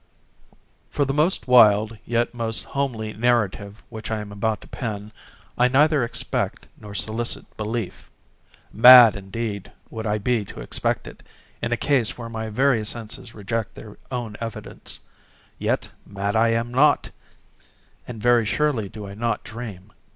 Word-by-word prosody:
For 145 Hz, -, 0 dB
the 135 Hz, -, -1 dB
most 155 Hz, +4 st, +1 dB
wild, 110 Hz, -3 st, +5 dB
yet 120 Hz, +1 st, 0 dB
most 115 Hz, -2 st, -2 dB
homely 115 Hz, -6 st, -3 dB
narrative 105 Hz, -3 st, 0 dB
which 110 Hz, -2 st, -7 dB
I 110 Hz, -1 st, -1 dB
am 105 Hz, -1 st, -7 dB
about 105 Hz, +2 st, -1 dB
to -, -, -14 dB
pen, 105 Hz, -3 st, -5 dB, 0.5 s
I 125 Hz, -, +6 dB
neither 145 Hz, +2 st, +3 dB
expect 120 Hz, -, -2 dB
nor 105 Hz, -1 st, -11 dB
solicit 115 Hz, +3 st, -2 dB
belief. 110 Hz, -2 st, -4 dB, 0.6 s
Mad 120 Hz, 0 st, +10 dB
indeed 100 Hz, 0 st, -5 dB, 0.2 s
would 110 Hz, -1 st, -4 dB
I 105 Hz, 0 st, +1 dB
be 115 Hz, +1 st, 0 dB
to -, -, -10 dB
expect -, -, -1 dB
it, -, -, -11 dB, 0.4 s
in 115 Hz, -, -2 dB
a 120 Hz, -, +1 dB
case 130 Hz, -6 st, +1 dB
where 115 Hz, -1 st, -7 dB
my 110 Hz, -1 st, -4 dB
very 125 Hz, 0 st, +2 dB
senses 115 Hz, +1 st, -6 dB
reject 110 Hz, +2 st, -3 dB
their 105 Hz, -2 st, -11 dB
own 120 Hz, -5 st, -4 dB
evidence. 115 Hz, -1 st, -6 dB, 0.6 s
Yet, -, -, -1 dB
mad 100 Hz, +1 st, -3 dB
am 115 Hz, +1 st, +2 dB
I -, -, -11 dB
not—and 125 Hz, -3 st, -2 dB
very 120 Hz, +1 st, +4 dB
surely 115 Hz, -2 st, 0 dB
do 105 Hz, 0 st, -8 dB
I 100 Hz, -, -8 dB
not 115 Hz, +3 st, -2 dB
dream. 105 Hz, -4 st, -8 dB
115 Hz, 150 wpm, -23 LUFS, 105-120 Hz, 0.6 s, Mad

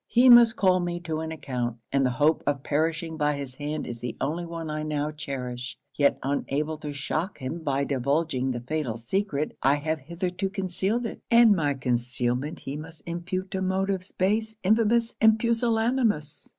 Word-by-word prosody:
He 250 Hz, +2 st, +5 dB
must 240 Hz, -1 st, +8 dB
call 185 Hz, -4 st, +3 dB
me 175 Hz, -1 st, -2 dB
to 160 Hz, -2 st, -3 dB
an 160 Hz, 0 st, -4 dB
account; 125 Hz, -6 st, -3 dB
and 135 Hz, 0 st, +2 dB
the 130 Hz, -, +3 dB
hope 145 Hz, +6 st, +2 dB
of 140 Hz, -1 st, 0 dB
perishing 160 Hz, +2 st, -1 dB
by 150 Hz, -1 st, +1 dB
his 140 Hz, -2 st, -6 dB
hand 150 Hz, +2 st, -4 dB
is 120 Hz, -1 st, -6 dB
the 120 Hz, 0 st, -5 dB
only 165 Hz, +5 st, -2 dB
one 165 Hz, -1 st, -5 dB
I 155 Hz, 0 st, -3 dB
now 150 Hz, -1 st, -1 dB
cherish. 130 Hz, -4 st, -5 dB, 0.2 s
Yet 145 Hz, -1 st, +3 dB
unable 145 Hz, +3 st, -1 dB
to 150 Hz, -1 st, -5 dB
shock 155 Hz, +6 st, -3 dB
him 135 Hz, +5 st, -4 dB
by 140 Hz, -3 st, 0 dB
divulging 140 Hz, 0 st, 0 dB
the 120 Hz, -2 st, -2 dB
fatal 130 Hz, -3 st, -2 dB
secret, 150 Hz, -, -2 dB
I 135 Hz, +2 st, +4 dB
have 155 Hz, +2 st, -2 dB
hitherto 180 Hz, +6 st, -3 dB
concealed 195 Hz, +4 st, -1 dB
it, -, -, -6 dB
and 230 Hz, -3 st, +7 dB
my 145 Hz, -5 st, +1 dB
concealment 125 Hz, +2 st, -1 dB
he 135 Hz, -, -5 dB
must 160 Hz, +1 st, -10 dB
impute 180 Hz, +2 st, -4 dB
to 190 Hz, -, -2 dB
motives 190 Hz, 0 st, -1 dB
base, 220 Hz, +3 st, 0 dB
infamous, 230 Hz, +3 st, +3 dB
and 220 Hz, -1 st, +6 dB
pusillanimous. 230 Hz, -, 0 dB
155 Hz, 175 wpm, -26 LUFS, 140-190 Hz, 0.2 s, must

